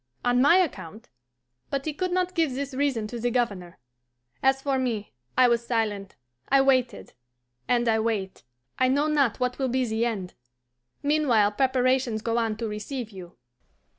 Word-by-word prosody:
On 245 0 +3
my 290 +7 +6
account? 230 - -3 0.6
But 275 -1 -2
he 310 - -2
could 365 +4 -2
not 365 0 0
give 320 -7 0
this 280 0 -4
reason 265 -5 0
to 235 +3 -6
the 245 +1 0
Governor. 200 -8 -2 0.6
As 265 0 +3
for 270 -1 -1
me, 230 -5 -3 0.2
I 255 - +6
was 235 -1 +1
silent, 210 -4 -2 0.3
I 275 - +5
waited 260 -2 +1 0.5
and 240 -1 +1
I 220 -1 +3
wait; 215 -4 -2 0.4
I 255 - +4
know 280 +3 +2
not 280 -7 +1
what 250 +1 -1
will 265 -1 0
be 255 +1 +1
the 225 +1 0
end. 195 -6 -4 0.7
Meanwhile 275 -9 +3
preparations 255 -2 +1
go 230 0 0
on 225 -2 -1
to 230 0 -3
receive 220 +3 -5
you." 180 -3 -11
245 Hz, 165 wpm, -26 LUFS, 220-270 Hz, 0.7 s, my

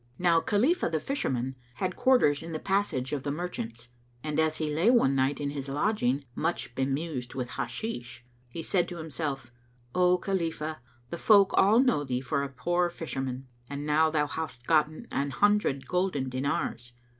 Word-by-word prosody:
Now 170 -2 +3
Khalifah 240 - +2
the 160 -1 0
Fisherman 130 - -2 0.2
had 185 +3 -2
quarters 245 - +4
in 165 0 -7
the 155 - -2
Passage 170 -10 0
of 145 - -1
the 145 - -3
Merchants, 120 -8 -5 0.3
[FN#208] 155 - -4
and, 150 - 0
as 160 0 +2
he 155 -2 -2
lay 170 +9 +3
one 235 - +4
night 135 +1 +1
in 140 -1 -2
his 140 -1 -5
lodging 140 - 0
much 120 - -2
bemused 135 0 -2
with 125 -2 -3
Hashish, 120 - -5 0.2
he 165 +6 -6
said 175 -1 +1
to 175 - -6
himself, 145 -5 -4 0.4
"O 180 0 +4
Khalifah, 165 -4 -2 0.3
the 170 - -4
folk 200 -3 +6
all 205 +4 +5
know 250 - +3
thee 125 -3 -1
for 135 +3 -1
a 140 - -3
poor 175 +6 0
fisherman, 135 -6 -4 0.2
and 140 +1 -5
now 155 +1 +4
thou 150 -2 +1
hast 145 -5 -5
gotten 155 - +2
an 140 +1 0
hundred 205 -5 +2
golden 180 -8 0
dinars. 130 -2 -2
150 Hz, 175 wpm, -28 LUFS, 135-180 Hz, 0.4 s, folk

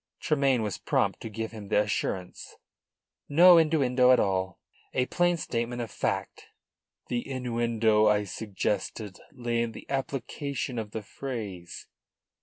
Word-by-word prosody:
Tremayne 135 -6 +2
was 105 -3 -3
prompt - - 0
to 115 - -5
give 110 +1 -4
him 110 -3 -9
the - - +3
assurance. 95 -3 -3 0.7
"No 170 +4 +8
innuendo 135 -6 +3
at 125 - +6
all. 95 -1 0 0.4
A 125 - +2
plain 175 +4 +1
statement 120 -4 -3
of 115 -3 -4
fact." - - -3 0.6
"The 120 +2 -2
innuendo 115 -4 +2
I 105 -1 +3
suggested 105 0 -3
lay 120 -4 -1
in 115 -1 -2
the - - -10
application 135 -1 -3
of 110 -2 -5
the 110 0 -5
phrase. 105 -9 -6
115 Hz, 135 wpm, -28 LUFS, 105-135 Hz, 0.7 s, No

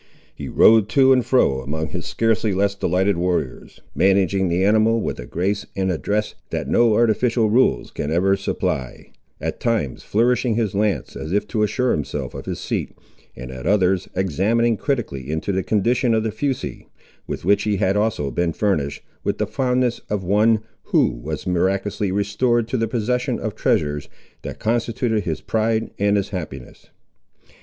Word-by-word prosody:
He - - -7
rode 110 -2 +5
to 135 -1 +5
and 125 -1 +3
fro 70 - +2
among 80 +4 -3
his - - -5
scarcely 110 -3 +1
less 100 +1 +2
delighted 95 -1 +1
warriors, 85 -7 -2
managing 95 0 +2
the 90 +2 +1
animal 110 +2 +3
with - - -3
a - - -7
grace 100 +4 -2
and 95 -1 0
address 105 +5 -1 0.2
that - - -3
no 115 -2 +3
artificial 115 0 +2
rules 110 - +2
can 75 - -4
ever 95 +5 +2
supply; 65 -9 -3 0.3
at - - -4
times 115 - -1
flourishing 120 +1 +1
his 110 -4 0
lance, 105 0 -1
as 80 - -6
if 105 +2 0
to 110 - -1
assure 125 +4 +1
himself 75 - -3
of - - -8
his - - -3
seat, - - -3 0.4
and 65 +1 -8
at 65 +3 -6
others 95 -2 +2
examining 100 +6 +1
critically 105 - -3
into 80 +5 -2
the 95 0 0
condition 115 +4 +1
of 110 - +1
the 110 - -1
fusee, 130 +4 -3 0.4
with - - -5
which 100 +2 +4
he 105 -2 0
had 95 0 +1
also 105 -10 0
been 85 +6 0
furnished, 80 -10 -1 0.2
with - - -1
the - - 0
fondness 125 -2 0
of 105 -2 -2
one, 105 +4 +3 0.2
who - - +3
was - - -6
miraculously 95 +2 0
restored 105 +4 +1
to 130 - -3
the 115 -2 0
possession 125 +2 -1
of - - -3
treasures, 75 -1 0 0.3
that - - -7
constituted 115 -1 -1
his 80 -3 -3
pride 110 0 0
and 100 +1 +3
his 100 - -1
happiness. 85 - -7
105 Hz, 170 wpm, -21 LUFS, 90-115 Hz, 0.4 s, rode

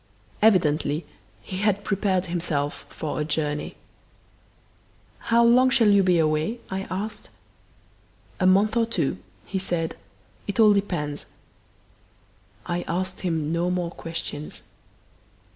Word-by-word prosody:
Evidently 155 -7 +3 0.4
he 185 - -6
had 205 0 +1
prepared 195 -2 0
himself 165 -5 -2
for 150 -1 -4
a - - +1
journey. 150 -1 -2 1.5
"How 235 +1 +5
long 250 +2 +6
shall 235 -4 +4
you 200 -1 +6
be 180 -2 +3
away?" 155 +8 +1
I 190 0 -3
asked. 205 +3 -5 1.1
"A 185 - +3
month 200 +4 +4
or 230 -1 +2
two," 155 - -1 0.3
he 190 - -3
said. 170 -3 -1 0.5
"It 200 +2 -3
all 215 -2 +7
depends." 175 -8 -2 1.4
I 175 0 -2
asked 185 +2 -2
him 160 -4 -1
no 170 +1 +1
more 180 -2 -1
questions. 165 -3 -6
180 Hz, 120 wpm, -25 LUFS, 160-205 Hz, 1.5 s, all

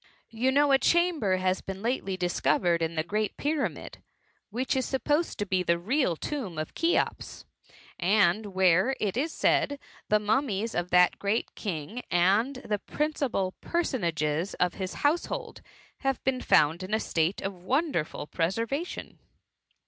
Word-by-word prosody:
You 240 +4 +1
know 285 +1 +4
a 270 - +5
chamber 335 - +2
has 185 0 0
been 195 +1 -7
lately 225 -6 -1
discovered 175 -1 +1
in 165 0 -1
the 155 - 0
great 210 +5 -2
pyramid, 295 0 -2 0.5
which 250 +6 -1
is 260 - +1
supposed 295 +6 0
to 205 - -1
be 185 -2 +1
the 170 -1 +2
real 215 - +1
tomb 215 - -5
of 155 0 -4
Cheops; 335 +1 -1 0.5
and 205 +2 +3
where, 190 +5 +3
it 205 -2 -1
is 300 +6 0
said, 285 -2 +1 0.3
the 210 - +5
mummies 220 0 0
ot 175 0 -2
that 180 0 +4
great 205 +3 -1
king 195 +4 -5
and 200 +10 +3
the 210 -1 0
principal 275 -10 -1
personages 170 - -1
of 180 -1 +1
his 190 -1 -5
liouse* 300 +4 +1
hold, - - -6 0.4
have 270 -2 -1
been 255 -1 0
found 155 +4 +3
in 190 +3 -1
a - - +1
state 165 -1 0
of 195 - -2
wonderful 190 - -1
preservation." 225 - -3
205 Hz, 150 wpm, -28 LUFS, 180-265 Hz, 0.5 s, a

